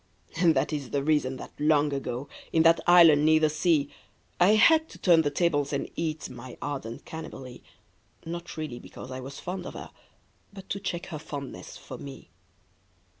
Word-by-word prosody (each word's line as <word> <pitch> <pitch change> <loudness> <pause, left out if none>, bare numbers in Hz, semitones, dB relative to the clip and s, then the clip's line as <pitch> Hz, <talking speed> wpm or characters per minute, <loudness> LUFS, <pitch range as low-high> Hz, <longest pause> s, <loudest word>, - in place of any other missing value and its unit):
And 165 -2 +4
that - - 0
is 140 -4 -4
the 140 -1 -1
reason 145 -3 +1
that - - -9
long 150 -1 +3
ago. 135 -1 -4 0.2
In 160 - +3
that 165 0 +5
island 165 -4 +7
near 155 0 +5
the 155 -1 +2
sea, 155 -1 +2 0.5
I 190 +4 +6
had 320 +7 +5
to - - -12
turn 170 -3 +5
the 145 - 0
tables 145 -2 0
and 140 - -3
eat 160 -2 -3
My 125 0 -10
ardent 135 -6 -5
Cannibalee 135 -6 -9 0.4
— - - -33
Not 170 0 -6
really 150 -6 -5
because 130 - -11
I 130 - -5
was 135 +2 -8
fond 180 0 -5
of - - -9
her, - - -8 0.6
But 195 -1 -12
to 200 - -2
check 180 -3 -4
her 155 - -4
fondness 145 -3 -8
for - - -10
me. 140 -1 -10
155 Hz, 185 wpm, -27 LUFS, 140-170 Hz, 0.6 s, island